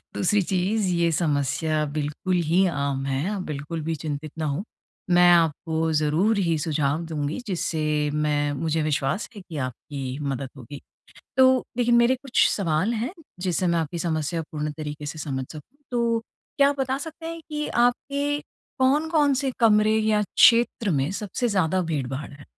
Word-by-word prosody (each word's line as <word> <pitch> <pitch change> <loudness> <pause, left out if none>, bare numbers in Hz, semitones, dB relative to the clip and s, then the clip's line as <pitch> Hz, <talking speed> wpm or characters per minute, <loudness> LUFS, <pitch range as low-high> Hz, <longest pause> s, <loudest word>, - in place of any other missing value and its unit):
दूसरी 205 +2 +2
चीज़ 190 +3 0
ये 170 -1 +2
समस्या 155 0 0
बिल्कुल 150 +5 -2
ही 170 +4 +3
आम 140 -4 -2
है। 135 +6 -1
आप 205 -2 -3
बिल्कुल 150 0 -5
भी 165 +1 -1
चिंतित 150 0 -5
ना 155 - -1
हों। 145 +6 -2 0.5
मैं 175 0 +7
आपको 160 -1 +2
ज़रूर 155 +8 +2
ही 170 -4 +1
सुझाव 150 0 0
दूँगी 150 -2 -3
जिससे 155 -5 0
मैं 150 -1 +1
मुझे 160 +2 -1
विश्वास 150 - -1
है 205 - -8
कि 170 -4 -9
आपकी 130 0 -5
मदद 135 -2 -3
होगी। 135 +3 -10 0.6
तो 260 -1 +5
देखिए 240 -1 +3
मेरे 235 +2 +5
कुछ 260 0 +2
सवाल 185 +3 0
हैं 235 +9 -2 0.3
जिससे 185 0 0
मैं 170 -1 +2
आपकी 165 +1 -3
समस्या 165 0 -1
पूर्ण 150 -1 -3
तरीके 150 -1 -6
से 155 - -6
समझ 135 -4 -3
सकूँ, 160 - -12
तो 235 -1 +1 0.4
क्या 280 0 +6
आप 285 0 -2
बता 265 +1 0
सकते 320 +2 -8
हैं 330 0 -5
कि 300 -1 -3
आपके 280 +4 +1 0.4
कौन-कौन 290 +2 +3
से 270 0 0
कमरे 215 -1 +4
या 215 -1 +2
क्षेत्र 230 0 +4
में 140 0 +1
सबसे 215 +5 -2
ज़्यादा 185 -3 +1
भीड़-भाड़ 140 -4 -3
है? 145 0 -13
165 Hz, 165 wpm, -24 LUFS, 150-220 Hz, 0.6 s, मैं